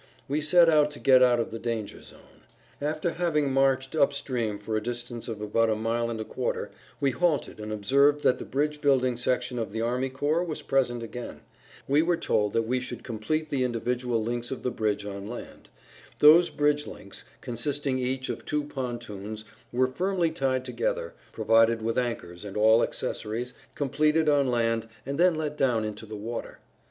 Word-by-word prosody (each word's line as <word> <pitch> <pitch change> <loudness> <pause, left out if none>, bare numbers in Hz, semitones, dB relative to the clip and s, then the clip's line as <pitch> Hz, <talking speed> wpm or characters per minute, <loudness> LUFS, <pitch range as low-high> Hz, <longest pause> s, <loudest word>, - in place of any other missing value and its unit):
We 145 +3 0
set 170 +3 +5
out 150 -2 +5
to 145 - -9
get 130 -1 +6
out 125 -1 +5
of 115 - -2
the 115 - -5
danger 115 -3 -4
zone. - - -17 0.4
After 155 +3 -1
having 150 -5 0
marched 135 +1 +2
up 145 -2 +3
stream 120 -7 -2
for 105 +2 -4
a 110 - 0
distance 120 +1 -6
of 110 -3 -5
about 115 +2 +1
a 110 - +2
mile 115 +2 -1
and 115 -1 -4
a 110 - -4
quarter - - -3 0.3
we 140 -1 +2
halted 160 -5 0
and 105 0 -6
observed 140 +8 +3
that 125 - +3
the - - -5
bridge 150 +2 -1
building 130 -3 +3
section 125 0 -1
of 110 -3 -3
the 110 +2 -3
army 125 +3 0
corps 145 +6 0
was 165 -4 -5
present 120 -3 +1
again. 120 +1 -7 0.5
We 145 +3 +4
were 170 +1 +1
told 105 -10 0
that 115 - +2
we 125 +3 0
should 125 - -7
complete 150 +8 -2
the 140 - 0
[Pg 125 -2 0
46]individual 125 -1 -1
links 120 +1 -3
of 135 - -5
the 125 - 0
bridge 105 -3 -1
on 100 0 -6
land. 120 +2 -9 0.5
Those 165 +4 +7
bridge 145 0 +1
links, 100 -1 -10 0.2
consisting 135 +2 -2
each 130 +1 -2
of - - -5
two 150 0 -1
pontoons, 120 -6 -6 0.3
were 125 +2 +3
firmly 175 +5 0
tied 130 -4 -1
together, - - -2 0.2
provided 115 0 +3
with 115 +2 +1
anchors 100 -8 -4
and 100 0 -6
all 110 +2 +5
accessories, 115 +3 -3 0.2
completed 150 +3 +2
on 140 -3 +3
land, 115 -2 +1 0.2
and 140 +3 -4
then 180 -1 +5
let 150 -1 -3
down 120 -5 +2
into 105 +1 -6
the 110 0 -7
water. 115 +3 -6
125 Hz, 190 wpm, -27 LUFS, 115-145 Hz, 0.5 s, Those